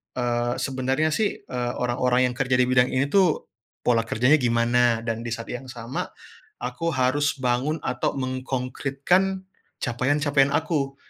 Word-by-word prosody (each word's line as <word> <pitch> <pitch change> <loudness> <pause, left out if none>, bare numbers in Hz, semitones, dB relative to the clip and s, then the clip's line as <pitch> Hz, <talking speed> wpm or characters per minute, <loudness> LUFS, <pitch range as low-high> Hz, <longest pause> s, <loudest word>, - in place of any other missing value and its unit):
eee, 120 -1 0
sebenarnya, 135 +3 0
sih, 210 +6 0
eee, 120 -1 -3
orang-orang 125 +1 +1
yang - - -9
kerja 130 -2 +2
di 125 - +4
bidang 125 0 +3
ini, 135 +2 0
tuh, 185 -5 +3 0.4
pola 115 -2 +2
kerjanya 125 +7 +3
gimana, 120 -1 +2
dan 115 -1 -2
di 120 0 -5
saat 115 - -8
yang 125 +2 -6
sama 120 +1 -5 0.5
aku 125 +7 -3
harus 135 +3 +1
bangun 130 +5 0
atau 125 - -1
menkongkritkan 135 +8 -1 0.4
capaian-capaian 140 +3 +1
aku. 150 -4 0
130 Hz, 140 wpm, -24 LUFS, 120-140 Hz, 0.5 s, di